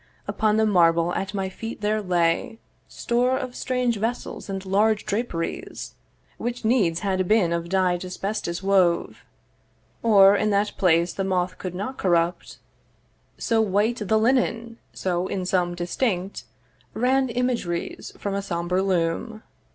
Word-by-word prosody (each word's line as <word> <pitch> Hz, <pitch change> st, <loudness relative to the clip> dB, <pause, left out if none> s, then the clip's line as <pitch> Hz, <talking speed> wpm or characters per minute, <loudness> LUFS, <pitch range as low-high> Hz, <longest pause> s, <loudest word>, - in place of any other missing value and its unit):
Upon 215 Hz, 0 st, +1 dB
the 220 Hz, -, +3 dB
marble 170 Hz, -3 st, +3 dB
at 195 Hz, 0 st, -3 dB
my 195 Hz, -1 st, -1 dB
feet 225 Hz, +4 st, -7 dB
there 215 Hz, +1 st, 0 dB
lay 175 Hz, +2 st, 0 dB, 0.3 s
Store 250 Hz, +2 st, 0 dB
of 255 Hz, -1 st, -5 dB
strange 250 Hz, -2 st, 0 dB
vessels 225 Hz, 0 st, -4 dB
and 195 Hz, 0 st, -4 dB
large 210 Hz, +3 st, +2 dB
draperies, 205 Hz, -6 st, -4 dB, 0.5 s
Which 240 Hz, -1 st, -4 dB
needs 195 Hz, -8 st, +2 dB
had 185 Hz, -2 st, 0 dB
been 200 Hz, -5 st, +3 dB
of 170 Hz, 0 st, -3 dB
dyed 185 Hz, -1 st, +1 dB
asbestos 185 Hz, -1 st, -4 dB
wove, 185 Hz, -3 st, +2 dB, 0.8 s
Or 200 Hz, -3 st, +6 dB
in 215 Hz, +1 st, +1 dB
that 205 Hz, 0 st, +1 dB
place 170 Hz, -1 st, +2 dB
the 195 Hz, -, -2 dB
moth 185 Hz, -1 st, -1 dB
could 180 Hz, -2 st, -5 dB
not 210 Hz, +8 st, -5 dB
corrupt, 175 Hz, -1 st, 0 dB, 0.8 s
So 225 Hz, -2 st, +1 dB
white 215 Hz, +3 st, +1 dB
the 220 Hz, -, +3 dB
linen, 230 Hz, -1 st, +1 dB
so, 180 Hz, 0 st, -2 dB
in 185 Hz, -1 st, -3 dB
some, 180 Hz, -1 st, 0 dB
distinct 180 Hz, +2 st, -2 dB, 0.5 s
Ran 260 Hz, +2 st, +2 dB
imageries 235 Hz, -8 st, -2 dB
from 200 Hz, -, -3 dB
a 200 Hz, -, -1 dB
sombre 175 Hz, 0 st, -1 dB
loom. 190 Hz, +4 st, -1 dB
195 Hz, 140 wpm, -24 LUFS, 180-225 Hz, 0.8 s, Or